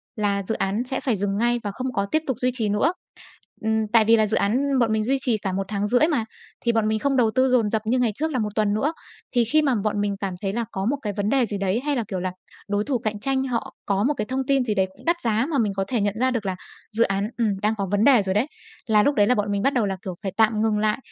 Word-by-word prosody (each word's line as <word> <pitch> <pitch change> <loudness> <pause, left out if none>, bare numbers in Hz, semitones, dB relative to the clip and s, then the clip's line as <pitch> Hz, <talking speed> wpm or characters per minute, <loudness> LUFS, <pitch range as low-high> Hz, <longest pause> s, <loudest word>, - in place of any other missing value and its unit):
là 200 -3 0
dự 220 +4 -2
án 200 +5 -1
sẽ 265 - -1
phải 250 -5 0
dừng 200 +1 -1
ngay 240 +2 +1
và 205 - -3
không 255 +4 -4
có 200 - 0
tiếp 315 - +2
tục 265 -5 -1
duy 250 0 +2
trì 220 -3 0
nữa. 240 - +2 0.7
Ừm, 220 0 0
tại 225 -2 +6
vì 225 +1 +6
là 220 -1 +3
dự 215 - 0
án 265 +6 +1
bọn 230 -2 +2
mình 215 0 +1
duy 265 +5 +1
trì 245 -5 +1
cả 195 -2 -3
1,5 200 +4 0
tháng 310 +2 +4
mà. 235 -7 0 0.4
Thì 235 - +4
bọn 225 -2 +1
mình 215 0 0
không 280 +3 0
đầu 230 -3 +3
tư 260 0 +4
dồn 240 -4 +3
dập 220 0 0
như 245 +4 +1
ngày 240 -3 +2
trước 315 +5 -2
là 260 - -1
1 215 -2 -1
tuần 210 -2 +2
nữa. 280 +9 0 0.4
Thì 240 - +5
khi 310 +7 +3
mà 275 -4 +2
bọn 210 -1 0
mình 205 -1 -1
cảm 195 -2 -2
thấy 195 -2 -2
là 235 +1 -1
có 190 +1 -3
một 280 +5 +1
cái 210 -4 -3
vấn 205 +1 0
đề 265 -1 +3
gì 205 -2 -4
đấy, 195 +2 0
hay 290 - +1
là, 240 - 0
kiểu 190 -3 -3
là, 185 0 -2 0.4
đối 205 0 +1
thủ 265 +2 0
cạnh 215 -2 -3
tranh 265 +3 0
họ 240 -3 -3
có 200 0 +1
một 285 +6 +2
cái 215 - -1
thông 260 +3 -2
tin 275 -2 +3
gì 215 -3 -1
đấy 190 -1 +2
cũng - - -19
đắt 340 +1 +3
giá 225 +1 +1
mà 290 - +1
mình 215 -5 +1
có 195 - 0
thể 240 -2 0
nhận 200 -1 +1
ra 260 +1 +2
được 230 -4 -2
là 190 -1 -1 0.4
dự 225 +2 +2
án, 195 +1 -1
ừm, 210 -5 0
đang 215 +1 +2
có 195 -1 -2
vấn 205 +1 +2
đề 260 -4 +6
rồi 190 -1 -1
đấy, 220 +7 +2 0.4
là 210 -2 +4
lúc 285 +4 +2
đấy 205 -2 +4
là 250 - +3
bọn 210 -2 -1
mình 200 0 0
bắt 275 +6 +2
đầu 240 -4 +2
là, 195 -1 -2
kiểu, 185 -2 -4
phải 195 - -2
tạm 220 -1 +3
ngừng 220 -1 +1
lại, 215 0 +1
220 Hz, 310 wpm, -23 LUFS, 205-250 Hz, 0.7 s, tại